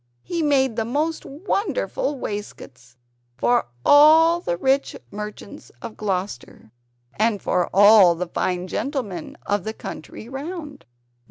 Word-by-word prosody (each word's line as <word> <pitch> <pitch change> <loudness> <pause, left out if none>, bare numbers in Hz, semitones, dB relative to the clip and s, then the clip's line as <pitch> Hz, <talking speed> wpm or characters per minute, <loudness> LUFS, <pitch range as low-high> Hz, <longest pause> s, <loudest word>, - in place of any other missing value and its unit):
He 340 -1 -3
made 270 -5 +2
the 225 - +1
most 300 +8 -2
wonderful 400 - -2
waistcoats 130 - -8 0.4
for 240 - +2 0.2
all 320 +3 +7
the 175 - -3
rich 270 +6 +1 0.2
merchants 210 - -8
of 215 - -8
Gloucester, 190 - -5 0.5
and 215 -1 +2
for 180 -2 0
all 200 -3 +7
the 180 +2 -3
fine 180 +1 -2
gentlemen 210 - -4
of 205 -2 -1
the 220 - -4
country 195 +1 -9
round. 290 +2 -7
225 Hz, 120 wpm, -22 LUFS, 190-290 Hz, 0.5 s, all